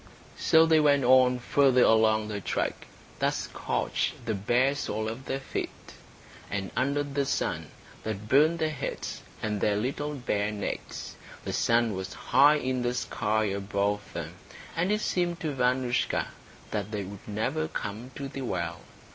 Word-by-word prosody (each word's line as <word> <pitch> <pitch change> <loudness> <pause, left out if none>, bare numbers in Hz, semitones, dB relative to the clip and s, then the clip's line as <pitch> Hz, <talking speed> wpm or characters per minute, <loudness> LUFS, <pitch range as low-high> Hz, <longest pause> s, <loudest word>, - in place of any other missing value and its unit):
So 160 0 +6
they 160 -1 +5
went 145 -2 +4
on 125 0 +6
farther 130 0 +4
along 110 -1 +4
the 105 -1 -4
track - - -2 0.3
that - - +2
scorched 120 - -2
the 110 - 0
bare 120 +7 +2
soles 110 -5 -2
of 130 +4 -9
their 135 - -2
feet, 135 - -3 0.8
and 100 -1 -3
under 140 +4 +1
the 140 0 -1
sun 135 - -1 0.3
that 105 -1 -5
burned 150 +7 +5
their 160 -1 0
heads 145 - -4 0.2
and 105 -2 -1
their 105 - +2
little 140 +7 -2
bare 105 -6 -1
necks. 105 -1 -5 0.3
The - - -3
sun 115 -1 +2
was 95 0 -5
high 145 +2 +5
in 130 -3 -1
the 120 0 0
sky 110 -3 0
above 100 0 0
them, - - -5 0.4
and 180 +4 +1
it 210 +1 +1
seemed 175 -4 0
to 155 -3 -2
Vanoushka 125 -1 +1 0.4
that 105 -2 -2
they 105 -2 -3
would 100 +1 -10
never 130 +10 -1
come 115 -4 -5
to 140 - -4
the 135 0 -6
well. 85 -8 -3
125 Hz, 160 wpm, -28 LUFS, 105-140 Hz, 0.8 s, So